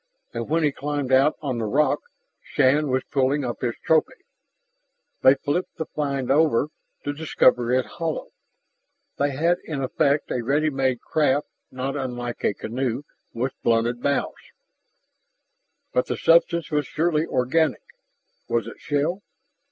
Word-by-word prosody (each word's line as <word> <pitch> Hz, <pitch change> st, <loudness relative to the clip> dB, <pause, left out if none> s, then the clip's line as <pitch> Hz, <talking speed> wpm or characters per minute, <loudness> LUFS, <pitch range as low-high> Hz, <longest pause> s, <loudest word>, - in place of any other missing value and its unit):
And 115 Hz, +1 st, -4 dB
when 165 Hz, +1 st, +2 dB
he 150 Hz, -, +3 dB
climbed 145 Hz, -1 st, -3 dB
out 135 Hz, +3 st, +4 dB
on 130 Hz, -4 st, -2 dB
the 115 Hz, -, -1 dB
rock, 150 Hz, +8 st, +2 dB, 0.4 s
Shann 145 Hz, +1 st, +2 dB
was 130 Hz, 0 st, +1 dB
pulling 135 Hz, +1 st, +1 dB
up 120 Hz, -, -4 dB
his 120 Hz, -2 st, -1 dB
trophy. 160 Hz, -1 st, +1 dB, 1.0 s
They 130 Hz, +1 st, +7 dB
flipped 145 Hz, +6 st, -2 dB
the 160 Hz, -, -3 dB
find 140 Hz, -4 st, -2 dB
over, 150 Hz, -2 st, +3 dB, 0.3 s
to 145 Hz, -, -2 dB
discover 130 Hz, -5 st, +2 dB
it 130 Hz, 0 st, +2 dB
hollow. 165 Hz, -2 st, -4 dB, 0.9 s
They 145 Hz, +1 st, +2 dB
had, 165 Hz, +6 st, +1 dB
in 140 Hz, -4 st, -4 dB
effect, 140 Hz, +3 st, +1 dB
a 125 Hz, -, 0 dB
ready 145 Hz, +6 st, +1 dB
made 130 Hz, -3 st, 0 dB
craft 145 Hz, -2 st, +1 dB, 0.2 s
not 130 Hz, +2 st, -4 dB
unlike 120 Hz, -3 st, -4 dB
a 100 Hz, -, +1 dB
canoe 125 Hz, +2 st, -3 dB, 0.3 s
with 125 Hz, +3 st, -2 dB
blunted 120 Hz, +1 st, +1 dB
bows. 140 Hz, 0 st, 0 dB, 1.6 s
But 125 Hz, -, +1 dB
the -, -, -2 dB
substance 170 Hz, 0 st, +3 dB
was 150 Hz, -2 st, 0 dB
surely 160 Hz, 0 st, 0 dB
organic: 130 Hz, +5 st, +1 dB, 0.7 s
Was 115 Hz, -3 st, +1 dB
it 115 Hz, -, -9 dB
shell? 150 Hz, +6 st, -1 dB
140 Hz, 145 wpm, -24 LUFS, 125-150 Hz, 1.6 s, They